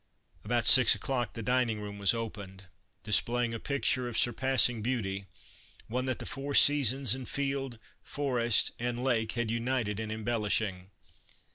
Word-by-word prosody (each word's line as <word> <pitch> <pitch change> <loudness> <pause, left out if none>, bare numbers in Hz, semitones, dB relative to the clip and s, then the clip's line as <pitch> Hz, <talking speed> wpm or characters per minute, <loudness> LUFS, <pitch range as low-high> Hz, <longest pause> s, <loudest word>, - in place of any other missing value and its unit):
About 120 +1 0
six 125 -2 +8
o'clock 130 -4 -3
the 115 - -7
dining 125 -2 0
room 100 -1 -8
was 100 -1 +4
opened, 100 -4 -7 0.4
displaying 120 +2 0
a 115 - -5
picture 130 -2 -1
of 115 - -5
surpassing 125 -1 +2
beauty, 100 -5 -3 0.6
one 125 +3 -2
that 130 -2 -2
the - - -8
four 140 +1 -5
seasons 135 -4 +4
and 130 -1 -7
field, 135 -3 -4 0.2
forest, 120 -6 0
and 120 +1 -3
lake 115 -4 0
had 120 -2 -2
united 115 -3 -2
in 110 -1 -5
embellishing. 105 -4 -3
120 Hz, 145 wpm, -29 LUFS, 110-130 Hz, 0.6 s, six